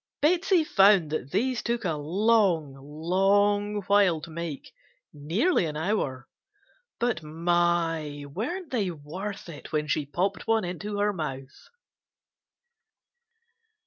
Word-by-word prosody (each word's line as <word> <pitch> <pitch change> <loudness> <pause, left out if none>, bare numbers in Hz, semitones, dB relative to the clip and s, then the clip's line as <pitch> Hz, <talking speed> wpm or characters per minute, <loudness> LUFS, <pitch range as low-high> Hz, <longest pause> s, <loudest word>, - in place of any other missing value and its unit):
Betsey 345 +3 +3
found 195 - +4
that 155 -4 -3
these 235 - 0
took 235 -2 -2
a 165 - +1
long, 175 -1 +2
long 195 +8 +1
while 195 -4 +3
to 165 - -9
make, 165 -3 -6 0.4
nearly 170 - +1
an 150 -1 -5
hour, 155 -8 -2 0.7
but 235 -6 0
my! 165 -2 0
weren't 275 - -5
they 215 -7 0
worth 180 +7 -7
it 160 -4 -10
when 150 -1 -1
she 145 -1 -1
popped 180 +8 -2
one 225 -3 +2
into 205 +4 -5
her 205 0 +1
mouth! 135 -6 -7
175 Hz, 115 wpm, -27 LUFS, 155-210 Hz, 0.7 s, found